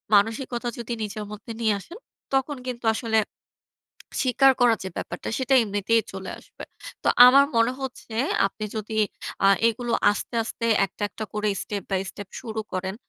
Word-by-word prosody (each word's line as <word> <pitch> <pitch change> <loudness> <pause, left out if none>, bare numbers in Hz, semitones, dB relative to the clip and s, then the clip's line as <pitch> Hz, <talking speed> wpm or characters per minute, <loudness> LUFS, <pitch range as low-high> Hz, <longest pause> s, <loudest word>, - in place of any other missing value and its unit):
মানসিকতা 235 +4 +1
যদি 235 0 -4
নিজের 210 0 -5
মধ্যে 210 +2 -8
নিয়ে 220 -2 +3
আসেন, 340 - -11 0.4
তখন 270 +2 +1
কিন্তু 245 -2 -5
আসলে 225 -1 0 1.1
স্বীকার 270 +1 +5
করার 235 -3 +5
যে - - -3
ব্যাপারটা, 175 - -5
সেটা 265 0 +2
এমনিতেই 205 +2 +1
চলে 190 -1 -6
আসবে। - - -12 0.4
তো, - - +1 0.2
আমার 275 +3 +8
মনে 230 +2 +4
হচ্ছে, 255 -4 -7 0.3
আপনি 215 +2 -6
যদি 215 0 -4 0.5
আ - - +7 0.2
এগুলো 240 +1 -2 0.2
আস্তে, 205 +3 -4
আস্তে 230 +1 -4 0.2
একটা, 195 - -11
একটা 220 - -6
করে 210 0 -1
step 205 -2 -4
by 190 -1 +1
step 205 -2 -9
শুরু 220 -2 -4
করেন, 190 +1 -3
225 Hz, 160 wpm, -25 LUFS, 205-245 Hz, 1.1 s, আমার